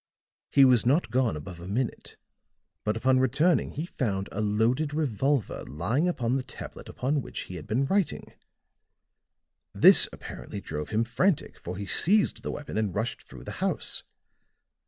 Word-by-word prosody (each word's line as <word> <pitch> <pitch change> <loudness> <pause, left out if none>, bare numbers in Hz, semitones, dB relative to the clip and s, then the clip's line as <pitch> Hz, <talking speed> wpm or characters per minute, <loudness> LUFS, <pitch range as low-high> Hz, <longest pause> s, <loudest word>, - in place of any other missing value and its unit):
He 140 -1 +6
was 125 -3 +5
not 130 +1 +2
gone 120 -8 +1
above 85 +4 -9
a 85 - -9
minute; 115 +5 -3 0.7
but 105 +1 0
upon 130 +2 +3
returning 150 +7 +2
he 155 +4 -3
found 100 - -2
a 110 - -3
loaded 115 +8 +1
revolver 135 -3 0
lying 110 - -1
upon 125 -7 -1
the - - -1
tablet 130 - -10
upon 140 +3 -1
which - - -6
he 90 - -8
had 80 -4 -8
been 125 +5 +1
writing. 195 +4 -1 1.4
This - - +8
apparently 100 - -8
drove 75 -4 -5
him 110 +1 +1
frantic, 150 - 0
for 90 +1 -6
he 100 - -4
seized 200 - +2
the - - -5
weapon 145 -6 -4
and 105 -5 -1
rushed 110 +4 -3
through - - -11
the - - -7
house. - - 0
120 Hz, 160 wpm, -27 LUFS, 105-145 Hz, 1.4 s, This